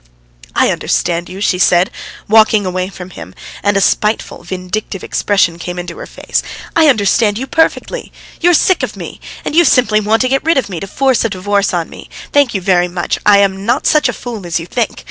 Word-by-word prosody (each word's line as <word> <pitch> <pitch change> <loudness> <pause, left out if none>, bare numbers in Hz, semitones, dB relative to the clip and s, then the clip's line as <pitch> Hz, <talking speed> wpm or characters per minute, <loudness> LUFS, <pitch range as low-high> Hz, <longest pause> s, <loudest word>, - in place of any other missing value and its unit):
"I - - +3
understand 175 0 -1
you," 190 - -8
she 180 -3 +1
said, 180 0 +3 0.4
walking 215 -1 +4
away 185 0 -2
from 180 -1 -10
him, 95 - -10 0.3
and 205 0 +1
a - - +2
spiteful, 210 +3 0
vindictive 185 +2 -5
expression 180 -5 0
came 180 +1 -6
into 175 -1 -6
her - - -8
face. - - -2 0.3
"I 325 -2 +5
understand 210 -3 +2
you 260 - -3
perfectly. 320 +4 -1 0.3
You 350 - +3
are - - +4
sick 370 +4 +3
of - - -3
me, - - -8 0.3
and - - -3
you 345 - +6
simply 240 -7 +3
want 215 +3 +1
to - - +1
get 270 +1 0
rid 325 -1 +2
of 250 -6 0
me, 180 -4 -5
to 195 - -6
force 260 +4 +1
this 230 - 0
divorce 200 +1 0
on 170 -2 -2
me. - - -12 0.2
Thank 285 -6 +3
you 195 - -1
very 180 -1 +2
much; 175 0 -3
I 200 -1 +7
am 195 -1 0
not 240 +7 0
such 305 - +3
a - - -2
fool 230 -5 -7
as 170 0 -1
you 165 - -7
think. 225 +5 -2
200 Hz, 220 wpm, -15 LUFS, 180-235 Hz, 0.4 s, I